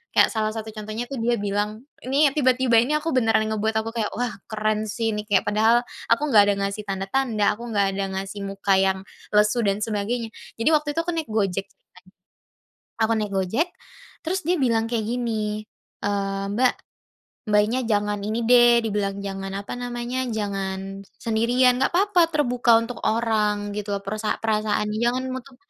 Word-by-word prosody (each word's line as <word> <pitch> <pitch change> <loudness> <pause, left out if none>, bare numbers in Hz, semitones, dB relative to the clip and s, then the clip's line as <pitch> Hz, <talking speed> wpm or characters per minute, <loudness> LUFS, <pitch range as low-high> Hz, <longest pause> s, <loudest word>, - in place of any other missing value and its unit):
kayak - - +5
salah 215 0 -1
satu 220 0 -5
contohnya 215 +2 -5
tuh 265 - -3
dia 240 +1 +1
bilang, 205 +2 -2 0.2
ini 280 +2 +4
tiba-tiba 255 -4 +3
ini 260 +6 +1
aku 315 +2 -1
beneran 225 -4 +3
ngebuat 220 +1 -1
aku 225 - -5
kayak 225 -2 -1
wah 245 0 -1 0.2
keren 215 0 -1
sih 225 +1 -1
ini 210 0 -4
kayak 200 -3 +3
padahal 220 +3 +3 0.2
aku 230 +5 +2
nggak 210 -3 +8
ada - - +2
ngasih 200 +2 -4
tanda-tanda, 205 +3 0
aku 240 - -7
nggak 200 -1 +2
ada 200 - -1 0.2
ngasih 195 +1 -6
muka 195 0 +1
yang 190 0 +1 0.3
lesu 210 +3 +4
dan 200 +1 0
sebagainya. 225 +2 -2 0.2
Jadi 230 +7 +1
waktu 300 -1 +1
itu 330 - +1
aku 345 - -2
naik 325 -2 -3
Gojek 200 -3 -1
kan, 180 -1 -24 1.0
aku 225 - +1
naik 210 -1 -2
Gojek, 220 - 0 0.6
terus 370 +3 -1
dia 355 +2 +2
bilang 230 -5 +2
kayak 225 -3 -1
gini, 220 -3 -2 0.4
eee, 195 -1 -1
"Mbak, 250 +3 +3 0.8
Mbaknya, 210 +4 +3
jangan 210 -2 0
ini 215 +3 -1
deh" 240 -1 +7
dibilang 200 -2 -1
jangan, 195 -1 -5
apa 200 0 -5
namanya, 245 +1 -3
"jangan 195 -2 -4 0.2
sendirian, 240 +3 +3
nggak - - +2
papa 370 -1 +4
terbuka 245 -6 +3
untuk 230 +1 -6
orang 210 -2 0
gitu 205 -1 -3
loh," 200 - -2
perasa 215 +2 -2
"perasaan 215 -1 0
jangan 240 +3 0
nutup 260 0 -7
220 Hz, 170 wpm, -24 LUFS, 205-245 Hz, 1.0 s, nggak